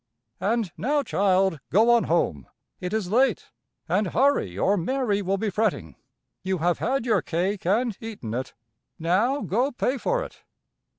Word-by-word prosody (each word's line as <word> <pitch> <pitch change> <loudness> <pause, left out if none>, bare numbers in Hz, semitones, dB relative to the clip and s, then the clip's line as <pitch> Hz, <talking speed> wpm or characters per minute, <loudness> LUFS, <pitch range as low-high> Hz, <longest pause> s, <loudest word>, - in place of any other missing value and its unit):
"And 210 0 0
now, 285 +5 +1
child, 190 - +2
go 220 +6 +4
on 235 -1 +4
home. 75 - 0 0.3
It 180 - -4
is 210 -4 -2
late. 250 0 +2 0.4
And 185 +4 +1
hurry 230 - +1
or 200 - +2
Mary 205 +2 0
will 195 +1 0
be 210 +1 -2
fretting. 195 - -1 0.5
You 190 0 -1
have 175 +1 0
had 260 0 0
your 220 -5 +2
cake 180 +3 -2
and 225 +3 +1
eaten 210 - -6
it. 130 +2 -4 0.4
Now 210 - +1
go 250 +8 0
pay 255 +1 -1
for - - 0
it. - - -12
205 Hz, 160 wpm, -25 LUFS, 180-240 Hz, 0.5 s, go